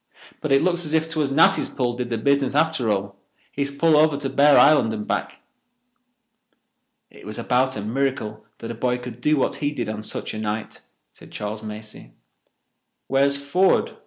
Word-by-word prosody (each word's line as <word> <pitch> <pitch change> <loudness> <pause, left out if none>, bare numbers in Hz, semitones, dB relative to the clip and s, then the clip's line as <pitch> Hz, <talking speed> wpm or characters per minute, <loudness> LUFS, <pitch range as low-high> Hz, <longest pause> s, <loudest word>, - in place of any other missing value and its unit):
"But 155 - -3
it 135 +2 +4
looks 175 -1 0
as 155 0 -2
if 160 0 +1
'twas 155 -3 -1
Natty's 165 +8 +3
pull 125 -3 -2
did 120 0 -4
the 115 - -2
business 140 +3 +1
after 155 -6 +1
all—his 100 +7 -4
pull 155 +3 +2
over 150 -1 +4
to 140 -2 -4
Bear 140 +1 +5
Island 140 -6 +5
and 105 -1 -5
back." - - -3 1.7
"It - - -16
was 105 +1 -7
about 130 0 0
a - - -4
miracle 110 -2 -2
that 115 - -7
a - - -4
boy 125 +2 -1
could 125 -1 -9
do 150 +3 +2
what 135 - 0
he 145 -1 -1
did 145 - -4
on 110 0 -5
such 110 - -3
a 110 - -5
night," 110 0 -4 0.3
said - - -16
Charles 105 +1 -5
Macey. 105 0 -10 0.9
"Where's 140 +1 +2
Ford?" 175 +7 +1
135 Hz, 180 wpm, -22 LUFS, 110-145 Hz, 1.7 s, Bear